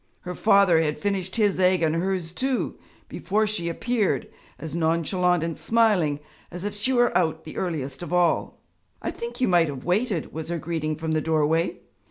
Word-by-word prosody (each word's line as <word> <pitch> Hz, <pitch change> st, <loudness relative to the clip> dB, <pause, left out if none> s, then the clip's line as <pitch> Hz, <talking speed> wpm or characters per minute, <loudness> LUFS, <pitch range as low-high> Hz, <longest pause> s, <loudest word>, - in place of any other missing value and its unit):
Her 180 Hz, -, -5 dB
father 195 Hz, -4 st, +4 dB
had 150 Hz, -2 st, -1 dB
finished 190 Hz, -2 st, -2 dB
his 205 Hz, -4 st, +2 dB
egg 185 Hz, -2 st, +3 dB
and 155 Hz, -1 st, +2 dB
hers 175 Hz, 0 st, -1 dB
too, 260 Hz, +6 st, -2 dB, 0.3 s
before 215 Hz, +3 st, 0 dB
she 205 Hz, -5 st, -2 dB
appeared, 220 Hz, +3 st, 0 dB, 0.3 s
as 160 Hz, -2 st, -7 dB
nonchalant 170 Hz, +1 st, +1 dB
and 165 Hz, -1 st, -2 dB
smiling 200 Hz, -11 st, +2 dB, 0.3 s
as 180 Hz, +1 st, -7 dB
if 205 Hz, -, -3 dB
she 210 Hz, +6 st, 0 dB
were 240 Hz, -1 st, +3 dB
out 160 Hz, -2 st, +1 dB
the 155 Hz, -, -9 dB
earliest 140 Hz, -7 st, -3 dB
of 175 Hz, -, -6 dB
all. 175 Hz, -1 st, +1 dB, 0.4 s
'I -, -, -1 dB
think 470 Hz, +1 st, -7 dB
you 255 Hz, -, +3 dB
might 175 Hz, -3 st, +4 dB
have 140 Hz, -3 st, -6 dB
waited!' 190 Hz, -1 st, 0 dB
was 160 Hz, 0 st, -5 dB
her 170 Hz, -, -1 dB
greeting 160 Hz, -1 st, -2 dB
from 160 Hz, +1 st, -4 dB
the 155 Hz, -1 st, +1 dB
doorway. 160 Hz, +2 st, +1 dB
175 Hz, 185 wpm, -25 LUFS, 160-200 Hz, 0.4 s, father